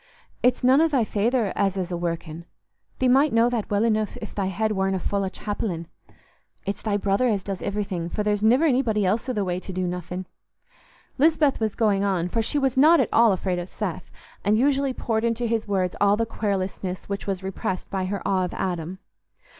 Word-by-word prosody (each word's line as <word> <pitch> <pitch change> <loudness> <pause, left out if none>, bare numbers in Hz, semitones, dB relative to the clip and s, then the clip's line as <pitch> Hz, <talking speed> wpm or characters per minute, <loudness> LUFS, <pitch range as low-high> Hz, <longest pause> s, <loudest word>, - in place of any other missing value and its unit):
"It's 250 0 +2
none 260 +4 +5
o' 325 - +5
thy 275 -7 +2
feyther 220 0 0
as 195 -1 +1
is 185 -1 -3
a - - -1
workin'—thee 170 +7 -5
might 275 +4 +4
know 230 +2 +3
that 230 -4 -2
well 205 +1 +1
anoof 215 -2 0
if 215 - -8
thy 195 -2 -1
head 215 +3 -1
warna 190 -1 0
full 200 +2 -1
o' 190 - -1
chapellin'—it's 200 0 -7
thy 210 -2 0
brother 200 +4 +1
as 205 -5 0
does 195 -2 -4
iverything, 195 -4 -3
for 210 - -1
there's 210 -1 0
niver 255 +8 +4
nobody 225 -6 +1
else 220 +7 0
i' - - 0
th' 205 -4 -1
way 180 0 -1
to 190 - -7
do 185 0 -2
nothin'." 180 +1 -4 0.9
Lisbeth 305 -1 +3
was 220 -2 -1
going 205 -3 +2
on, 185 -3 0
for 225 - 0
she 225 - -2
was 270 -3 +1
not 315 +5 +7
at - - +2
all 230 -1 +6
afraid 185 -1 -1
of 175 +1 -6
Seth, - - -5 0.3
and 210 +2 +3
usually 275 +2 +2
poured 225 -3 -2
into 235 +1 0
his 225 -1 -1
ears 185 -3 +1
all 205 0 +4
the 230 - +1
querulousness 190 -4 -3
which 200 0 -4
was 190 -1 -2
repressed 190 -1 -4
by 190 -2 -1
her 200 +2 -3
awe 190 -1 +2
of 180 - -6
Adam. 175 -1 -3
205 Hz, 205 wpm, -24 LUFS, 185-230 Hz, 0.9 s, not